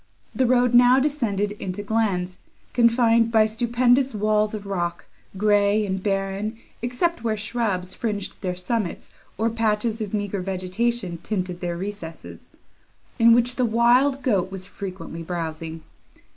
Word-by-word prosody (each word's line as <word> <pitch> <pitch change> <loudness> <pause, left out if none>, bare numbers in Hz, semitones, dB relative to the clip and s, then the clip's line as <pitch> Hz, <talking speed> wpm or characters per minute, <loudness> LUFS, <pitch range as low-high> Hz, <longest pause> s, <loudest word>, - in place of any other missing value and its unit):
The 260 - +2
road 245 0 +3
now 245 +1 +7
descended 235 -8 0
into 190 +2 -4
glens, 200 -5 -1 0.3
confined 235 -1 +4
by 220 -1 +5
stupendous 240 +3 +2
walls 210 0 +1
of 205 -1 -7
rock, 175 -3 -3 0.3
grey 205 +1 +3
and 190 -1 -2
barren, 195 +2 -2 0.2
except 245 +4 -1
where 220 -2 0
shrubs 210 -4 -2
fringed 210 -4 -4
their 180 -2 -2
summits, 185 +1 -3 0.2
or 225 +3 +1
patches 225 0 0
of 210 -3 -4
meagre 205 -2 -2
vegetation 185 +1 -2
tinted 180 -4 -3
their 175 -1 -3
recesses, 185 -4 -8 0.7
in 230 0 +7
which 245 +1 +2
the 255 - +2
wild 245 +4 +3
goat 195 -7 +1
was 190 -1 -3
frequently 185 -4 -7
browsing. 165 -1 -5
210 Hz, 135 wpm, -23 LUFS, 190-235 Hz, 0.7 s, now